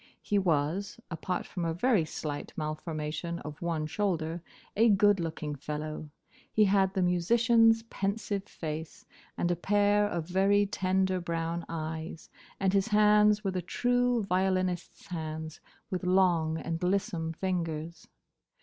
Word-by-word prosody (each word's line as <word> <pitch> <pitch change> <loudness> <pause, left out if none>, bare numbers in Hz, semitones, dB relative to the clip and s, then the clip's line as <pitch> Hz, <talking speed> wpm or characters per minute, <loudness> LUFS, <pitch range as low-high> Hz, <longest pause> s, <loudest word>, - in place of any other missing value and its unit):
He 205 - +1
was—apart 180 +2 -1
from 180 - -5
a 165 -1 -1
very 210 -3 +2
slight 150 -1 -5
malformation 155 +2 -3
of 150 -1 -8
one 165 -3 -1
shoulder—a 175 +5 -1
good 205 -1 +4
looking 160 -2 -3
fellow. 150 +2 -5 0.4
He 215 - +4
had 195 0 +2
the 190 - +2
musician's 225 +6 +4
pensive 200 -2 -3
face, 160 -3 -6 0.3
and 175 - +1
a - - +2
pair 205 +3 +3
of 170 -5 -3
very 195 +3 +3
tender 190 -1 0
brown 170 0 -3
eyes, 160 0 -5 0.3
and 190 -1 +1
his 195 +1 +2
hands 210 0 +4
were 195 - 0
the 185 -1 -2
true 245 +4 +1
violinist's 185 -1 -1
hands, 160 -2 -5 0.3
with 185 -1 -2
long 180 -4 +3
and 165 0 -4
lissome 180 -3 0
fingers. 170 -2 -3
180 Hz, 130 wpm, -30 LUFS, 160-200 Hz, 0.4 s, good